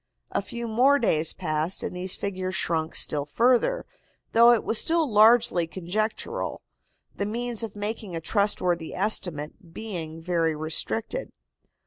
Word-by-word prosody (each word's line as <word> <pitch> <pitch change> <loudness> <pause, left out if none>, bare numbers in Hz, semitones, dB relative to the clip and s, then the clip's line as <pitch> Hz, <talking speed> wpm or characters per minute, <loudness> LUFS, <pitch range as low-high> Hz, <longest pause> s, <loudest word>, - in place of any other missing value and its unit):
A - - 0
few 235 -1 -6
more 255 +6 +4
days 160 - +2
passed 160 0 -2
and - - -4
these 185 +1 -2
figures 185 -2 -4
shrunk 160 -2 -1
still 145 -2 +2
further, 245 - +2 0.5
though 235 +1 +7
it 235 - +2
was 220 - +3
still 330 -1 +1
largely 215 -5 +4
conjectural, 190 +6 -3 0.5
the 200 - -2
means 235 +1 -2
of 225 -3 -5
making 205 -2 -5
a - - -2
trustworthy 180 -2 0
estimate 180 -3 -1
being 165 -7 -6
very 165 -1 0
restricted. 150 -8 -3
190 Hz, 135 wpm, -26 LUFS, 165-225 Hz, 0.5 s, though